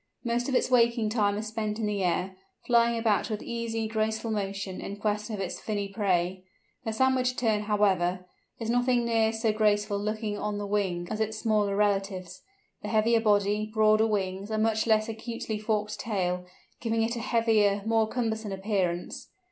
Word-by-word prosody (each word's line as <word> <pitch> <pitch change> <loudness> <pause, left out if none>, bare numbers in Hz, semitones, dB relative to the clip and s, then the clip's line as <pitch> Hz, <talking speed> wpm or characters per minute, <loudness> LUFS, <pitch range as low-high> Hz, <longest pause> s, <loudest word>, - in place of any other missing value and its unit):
Most 240 +1 -1
of 265 - 0
its 255 - +1
waking 235 -2 +3
time 205 -2 +1
is 215 - -3
spent 215 -1 -3
in 225 - -1
the 205 -2 -1
air, 180 +2 0 0.3
flying 235 -1 +3
about 225 0 +1
with 215 -2 -3
easy, 230 -1 -3
graceful 220 +1 -1
motion, 195 -2 -3
in 200 - -6
quest 210 +1 -1
of 215 -3 -4
its 190 -2 -4
finny 205 -2 -2
prey. 185 -3 0 0.4
The 225 - -1
Sandwich 255 +2 +2
Tern, 220 -4 0
however, 190 -4 +1 0.3
is 230 -1 -2
nothing 245 0 +2
near 225 -1 +2
so 225 -1 0
graceful 210 -1 +1
looking 215 0 -2
on 210 -1 -2
the 205 - -3
wing 190 -4 -1
as 215 0 -2
its 220 0 -1
smaller 210 -3 +1
relatives, 195 -3 -1 0.4
the - - -6
heavier 225 +1 +3
body, 210 0 +2
broader 215 0 +4
wings, 195 -1 -2
and 215 0 0
much 220 0 +1
less 215 -1 +3
acutely 225 -1 -4
forked 210 -1 -1
tail 180 -4 -2 0.3
giving 225 -1 0
it 230 +2 -1
a - - -3
heavier, 220 -4 +2
more 225 -1 +2
cumbersome 220 -3 -2
appearance. 190 -3 -2
215 Hz, 175 wpm, -28 LUFS, 200-225 Hz, 0.4 s, broader